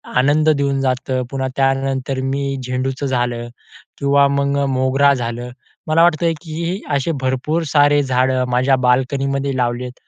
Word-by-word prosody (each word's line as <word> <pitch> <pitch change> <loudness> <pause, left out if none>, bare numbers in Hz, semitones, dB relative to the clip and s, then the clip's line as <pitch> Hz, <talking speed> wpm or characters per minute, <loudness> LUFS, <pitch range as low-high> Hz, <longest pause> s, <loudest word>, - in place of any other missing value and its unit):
आनंद 145 +5 +3
देऊन 140 -2 +1
जातं. 130 0 -1
पुन्हा 135 -1 -2
त्यानंतर 135 0 0
मी 140 +1 -2 0.2
झेंडूचं 130 +2 -3
झालं 120 -2 -1 0.5
किंवा 140 0 +3
मग 140 0 0 0.2
मोगरा 135 +2 +3
झालं 120 -1 -4 0.4
मला 160 +2 +4
वाटतं 170 0 +3
की 170 +4 -4
असे 140 +4 0
भरपूर 130 +6 -1
सारे 145 0 +4
झाडं 130 0 +1
माझ्या 130 +2 +2
बाल्कनीमध्ये 135 +2 0
लावली 120 0 -1
आहेत. 125 0 -7
135 Hz, 135 wpm, -18 LUFS, 130-140 Hz, 0.5 s, मला